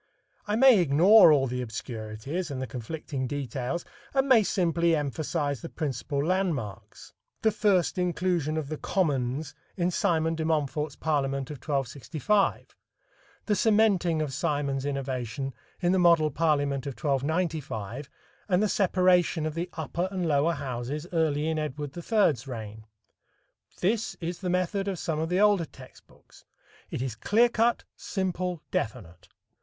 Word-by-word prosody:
I 210 - 0
may 250 -2 +7
ignore 175 +5 +7
all 140 -3 +4
the 125 0 -3
obscurities 115 - -5
and 135 -2 -4
the 130 - -2
conflicting 130 +3 -5
details, 140 +3 -3 0.3
and 270 0 +3
may 255 -4 +6
simply 170 -4 +1
emphasize 145 -1 -2
the 165 - -7
principal 140 -1 -3
landmarks 165 - -3 0.3
the 220 - +4
first 195 -4 +2
inclusion 175 -3 0
of 155 -3 -2
the 155 - -4
"commons" 145 -4 -1 0.2
in 175 0 +1
Simon 165 -2 +1
de 160 -1 -3
Montfort's 150 -2 -1
parliament 140 -3 -1
of 150 - -6
1265; 145 - -1 0.7
the 210 - +1
cementing 200 -8 +3
of 140 -3 -5
Simon's 145 -4 -1
innovation 135 -1 -3 0.3
in 175 -1 +2
the 190 - +3
Model 170 -3 +4
Parliament 145 -3 0
of 140 - -3
1295, 145 - -2 0.4
and 185 +2 +3
the - - +3
separation 180 -4 +2
of 155 - -2
the 170 +2 -3
upper 165 +3 -2
and 185 -3 -2
lower 150 +2 +2
Houses 140 +1 -4
early 155 -2 +1
in 160 -1 0
Edward 145 -1 -4
III's 170 - +1
reign. 110 -3 -7 0.9
This 215 +4 0
is 170 0 -4
the 185 - -3
method 185 +2 0
of 195 -2 -2
some 160 -2 -2
of 160 +1 -1
the 180 +1 +1
older 205 -4 +4
text - - -15
books. - - -21 0.5
It 125 - -3
is 130 -4 -3
clear 225 - +3
cut, 235 +1 +1
simple, 180 -3 -3
definite. 100 -7 -4
155 Hz, 145 wpm, -27 LUFS, 135-180 Hz, 0.9 s, may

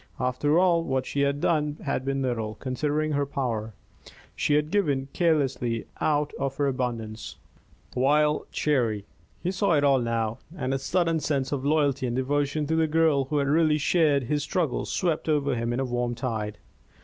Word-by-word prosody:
After 130 +5 +1
all, 175 -2 +4
what 130 -3 -1
she 140 - -2
had 140 0 +1
done 150 -2 +1
had 140 -3 -1
been 135 0 -1
little, 115 -4 -2
considering 150 +6 -1
her 145 -1 0
power. 115 -6 -3 0.6
She 145 - +1
had 150 +1 +1
given 145 -10 +1
carelessly, 135 -9 +1
out 150 -1 +1
of 135 -1 -2
her 145 - +1
abundance, 120 -5 -3 0.6
while 150 +4 +2
Cherry 115 -9 0 0.4
He 180 - 0
saw 195 -1 +1
it 145 -2 +3
all 140 -2 +4
now, 115 -1 -1 0.2
and 130 -3 -1
a 135 - 0
sudden 165 +3 +1
sense 140 -2 -1
of 140 -3 -2
loyalty 145 -3 +1
and 120 - -2
devotion 145 +3 0
to 160 +2 0
the 160 0 +2
girl 155 -3 +3
who 150 +3 -2
had 140 -1 +1
really 155 +1 +3
shared 150 -3 +2
his 145 +4 -1
struggles 145 +6 -1
swept 165 -3 -1
over 145 -3 +2
him 115 -1 -1
in 120 - -1
a 135 - 0
warm 120 -1 -1
tide. 110 -4 -3
140 Hz, 180 wpm, -26 LUFS, 125-150 Hz, 0.6 s, all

